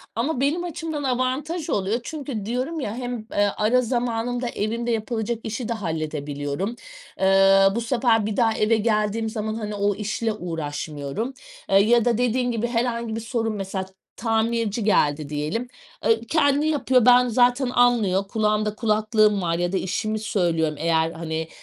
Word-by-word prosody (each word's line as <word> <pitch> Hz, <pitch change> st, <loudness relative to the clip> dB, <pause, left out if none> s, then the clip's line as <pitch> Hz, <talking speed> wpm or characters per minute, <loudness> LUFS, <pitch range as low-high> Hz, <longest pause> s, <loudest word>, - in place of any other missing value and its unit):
Ama 255 Hz, +4 st, -1 dB
benim 315 Hz, +6 st, +1 dB
açımdan 320 Hz, -3 st, -4 dB
avantaj 265 Hz, +6 st, -1 dB
oluyor. 200 Hz, +4 st, 0 dB
Çünkü 275 Hz, -10 st, -5 dB
diyorum 255 Hz, +8 st, -2 dB
ya 220 Hz, -6 st, -3 dB
hem, 245 Hz, -3 st, -5 dB
eee, 205 Hz, 0 st, +2 dB
ara 230 Hz, +4 st, +3 dB
zamanında 245 Hz, 0 st, -1 dB
evimde 235 Hz, +3 st, -2 dB
yapılacak 220 Hz, 0 st, -2 dB, 0.2 s
işi 225 Hz, +2 st, -4 dB
de 235 Hz, -, +1 dB
halledebiliyorum. 155 Hz, 0 st, -3 dB, 0.4 s
Eee, 195 Hz, 0 st, +5 dB
bu 235 Hz, -, 0 dB
sefer 230 Hz, -3 st, +2 dB
bir 215 Hz, -1 st, -3 dB
daha 225 Hz, -2 st, +3 dB
eve 220 Hz, +1 st, +3 dB
geldiğim 215 Hz, 0 st, 0 dB
zaman 215 Hz, 0 st, -3 dB
hani 210 Hz, -2 st, -4 dB
o 200 Hz, 0 st, +1 dB
işle 215 Hz, +2 st, -2 dB
uğraşmıyorum. 160 Hz, -, -4 dB, 0.4 s
Eee, 195 Hz, -, +5 dB
ya 235 Hz, +2 st, +3 dB
da 235 Hz, -2 st, +2 dB
dediğin 245 Hz, +1 st, +1 dB
gibi 230 Hz, 0 st, -1 dB
herhangi 235 Hz, -1 st, -1 dB
bir 225 Hz, -, -4 dB
sorun, 225 Hz, -1 st, -2 dB
mesela 190 Hz, -1 st, -4 dB, 0.3 s
tamirci 225 Hz, -1 st, 0 dB
geldi 150 Hz, -7 st, +2 dB
diyelim, 155 Hz, +11 st, -2 dB, 0.4 s
ııı, 225 Hz, 0 st, +3 dB
kendi 290 Hz, -1 st, +2 dB
yapıyor. 260 Hz, -5 st, +2 dB
Ben 250 Hz, 0 st, +6 dB
zaten 245 Hz, +2 st, +3 dB
anlıyor 220 Hz, -6 st, +2 dB
kulağımda 215 Hz, 0 st, 0 dB
kulaklığım 215 Hz, -2 st, +2 dB
var 170 Hz, -1 st, 0 dB
ya 175 Hz, 0 st, -1 dB
da 190 Hz, -, 0 dB
işimi 215 Hz, +3 st, -2 dB
söylüyorum. 170 Hz, -7 st, 0 dB
Eğer 165 Hz, 0 st, +1 dB
hani, 160 Hz, -1 st, -4 dB
220 Hz, 155 wpm, -23 LUFS, 195-245 Hz, 0.4 s, Ben